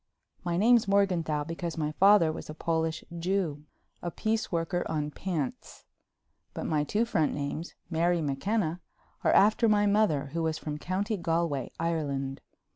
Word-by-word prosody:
My 175 -1 -1
name's 230 +2 +5
Morganthau 180 -7 +2
because 165 +1 -5
my 150 -1 -1
father 190 -1 +5
was 155 - -8
a 155 - -6
Polish 160 0 -1 0.2
Jew—a 170 -2 -3
piece 220 +5 -1
worker 175 +1 0
on 150 -2 -1
pants—but 160 -6 -7
my 150 -2 +1
two 210 +9 +1
front 160 -9 +1
names, 145 +4 -4
Mary 170 +1 +1
McKenna, 165 +4 -1 0.4
are - - +4
after 215 +3 +5
my 205 -1 +4
mother, 200 -10 +2
who 165 - -1
was 160 -1 0
from 150 -1 -5
County 200 +6 -1
Galway, 165 -6 -1
Ireland. 140 -5 -2
165 Hz, 140 wpm, -29 LUFS, 155-195 Hz, 0.4 s, name's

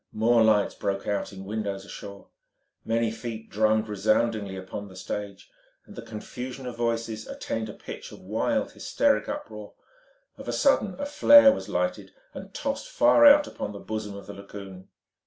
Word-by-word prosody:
More 115 +1 +4
lights 105 -2 +3
broke 100 0 -3
out 100 -1 -2
in 95 -1 -9
windows 100 -2 -4
ashore. 100 -1 -10 0.5
Many 115 0 0
feet 110 0 -7
drummed 110 +1 +2
resoundingly 105 0 0
upon 95 +2 -7
the 95 - -14
stage, 100 +1 -6 0.3
and - - -14
the - - -6
confusion 125 +4 -7
of 125 -2 -5
voices 115 -2 -2
attained 110 -1 -4
a - - -7
pitch - - -9
of - - -11
wild, 110 - -1
hysteric 285 -1 +1
uproar. 295 +1 -7 0.6
Of - - -9
a - - -2
sudden 215 -9 +2
a 285 - -2
flare 285 -1 +8
was 275 - -5
lighted - - -2 0.2
and - - -9
tossed - - -4
far 395 -12 +6
out 290 +1 +8
upon 105 - -6
the 100 - -8
bosom 110 -2 -5
of 100 -1 -9
the 100 - -8
lagoon. 100 -1 -10
110 Hz, 170 wpm, -26 LUFS, 100-120 Hz, 0.6 s, flare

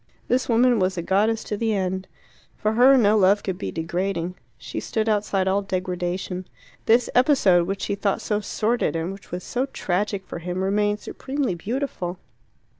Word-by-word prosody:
This 255 +1 +1
woman 240 0 +4
was 185 0 0
a 170 - -2
goddess 215 +5 +1
to 210 - -3
the 220 0 0
end. 190 -1 -2 0.5
For 215 0 0
her 255 +4 +6
no 215 -3 +4
love 200 0 +4
could 190 -1 -3
be - - -3
degrading: 175 +1 -2 0.2
she - - -6
stood 220 0 -2
outside 205 -3 +1
all 195 +1 +2
degradation. 185 -1 -3 0.4
This 230 +2 +4
episode, 225 - +4
which 195 +1 -3
she - - -1
thought 200 0 0
so 210 -1 -1
sordid, 220 0 0
and 165 +3 -2
which 195 - -13
was 180 +1 -5
so 255 +2 -2
tragic 195 -3 -2
for - - -6
him, 180 +2 -3
remained 205 +2 +1
supremely 270 -5 -3
beautiful. 190 -2 -3
200 Hz, 175 wpm, -24 LUFS, 185-225 Hz, 0.5 s, her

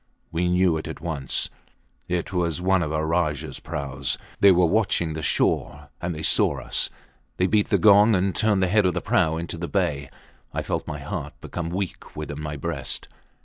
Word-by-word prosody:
We 85 +2 0
knew 90 -2 +3
it 80 - -5
at - - -6
once; 75 -5 -2 0.6
it 90 +2 -2
was 85 -3 0
one 95 +1 +2
of 75 -3 -2
our 80 0 0
Rajahs 80 -3 -1
praus. 70 -2 -3 0.2
They 100 - +7
were 90 -1 +5
watching 85 -4 +1
the 80 - -4
shore, 75 0 0
and 85 -3 -3
saw - - +3
us. - - 0 0.5
They 90 - +2
beat 105 +2 +2
the - - +4
gong, 105 +1 +6
and 95 +1 +1
turned 105 -4 +2
the - - +3
head 105 +1 +3
of 90 - 0
the - - -1
prau 80 0 +2
into 85 0 -5
the 85 - -3
bay. 75 -9 -1 0.5
I - - -1
felt - - -3
my - - -4
heart - - -6
become 85 -2 -5
weak 95 +1 -5
within 75 -1 -5
my 75 -1 -4
breast. 75 -3 -3
85 Hz, 190 wpm, -24 LUFS, 75-95 Hz, 0.6 s, They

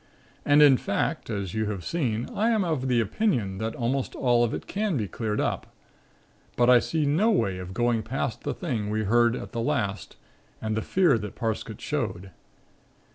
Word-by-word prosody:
And, 145 +1 +6
in 140 -3 +7
fact, - - -2
as 100 -5 -3
you 110 -1 -1
have 100 -4 -4
seen, 125 -9 -1
I 220 +3 +1
am 220 -4 +2
of 155 -7 -1
the 125 -2 +2
opinion 115 - 0
that 110 +1 -3
almost 130 +2 -2
all 120 -2 +3
of 120 - 0
it - - -5
can 205 -5 -1
be 105 -4 -2
cleared 105 +3 -3
up, - - -1 0.9
but 120 +1 +4
I 125 - +8
see 155 +4 -1
no 165 +11 +3
way 100 - +1
of 90 +1 -7
going 120 -2 +1
past 120 +1 -3
the - - -3
thing 115 - -3
we 110 +1 -1
heard 120 +3 +3
at - - -7
the 115 - -3
last 105 -7 -2 0.4
and 110 -1 -2
the 110 - 0
fear 170 - +3
that 105 -1 -7
Parsket 115 -3 -3
showed. 95 +2 -3
120 Hz, 190 wpm, -26 LUFS, 110-145 Hz, 0.9 s, I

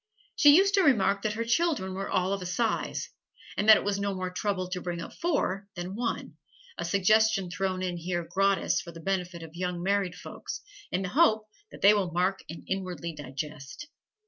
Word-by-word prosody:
She 290 -1 +7
used 395 +1 +4
to 395 - +5
remark 205 - +3
that 215 0 -1
her 230 +2 -3
children 240 - +1
were 195 +1 -4
all 185 +2 +1
of 200 - -3
a - - -5
size, 220 +6 -1 0.4
and 210 - +1
that 220 - +11
it - - -3
was 200 0 -1
no 200 -1 -1
more 185 -1 -3
trouble 185 -1 -2
to 180 0 -3
bring 175 -1 -4
up - - -7
four 240 - -1
than 175 +1 -5
one, 235 +1 -3 0.4
a - - -4
suggestion 200 -1 +3
thrown 185 0 -2
in 180 -1 -2
here 175 0 -2
gratis 195 0 +1
for 170 - -10
the 165 - -11
benefit 180 -1 -2
of 160 -1 -11
young 180 0 -3
married 195 -2 0
folks, - - -7 0.3
in 185 +2 0
the 180 - -3
hope 220 - +3 0.3
that - - -12
they 200 +2 +8
will 200 -4 +1
mark 180 +3 0
and 165 - -8
inwardly 180 -4 -3
digest. 150 - -7
190 Hz, 200 wpm, -28 LUFS, 180-210 Hz, 0.4 s, that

